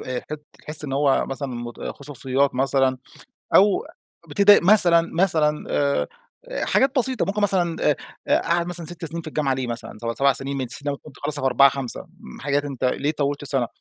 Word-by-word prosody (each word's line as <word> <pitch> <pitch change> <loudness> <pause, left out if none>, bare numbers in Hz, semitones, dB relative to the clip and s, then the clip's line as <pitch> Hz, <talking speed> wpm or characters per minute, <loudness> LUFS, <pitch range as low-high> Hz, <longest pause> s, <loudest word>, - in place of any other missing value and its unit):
تح 125 -1 -6 0.3
تحس 150 0 -2
إن 135 - -5
هو 140 -1 +2
مثلًا 135 +1 -4
مت 120 -1 -7
خصوصيات 140 -1 -2
مثلًا، 135 0 +1 0.6
أو 200 0 +4 0.4
بتضايق 200 +6 +5
مثلًا، 175 -3 +7
مثلًا 160 -4 +2
آآ، 140 -1 0 0.4
آآ - - -3
حاجات 265 0 +2
بسيطة، 255 -1 +1
ممكن 205 +1 -2
مثلًا 175 -4 +1
آآ، - - +2 0.3
آآ - - +3
قعد 170 +1 0
مثلًا 175 -2 -3
6 170 0 -7
سنين 165 +2 -5
في 160 - -11
الجامعة 145 -3 -1
ليه 130 -1 -3
مثلًا، 115 -2 -6
سب 115 0 -2
7 140 +2 +3
سنين 135 +1 -3
من 135 - -2
الأساس 125 +2 -5
أنت 145 - -8
المفروض 145 +1 -5
تخلّصها 145 -1 -2
في 135 - +2
4، 135 +2 +6
5، 135 -2 -4
امم 65 - -15
حاجات 145 +1 0
أنت 135 -3 -6
ليه 145 +4 0
طوّلت 145 -1 -2
السنة؟ 135 -4 -1
145 Hz, 195 wpm, -22 LUFS, 135-170 Hz, 0.6 s, مثلًا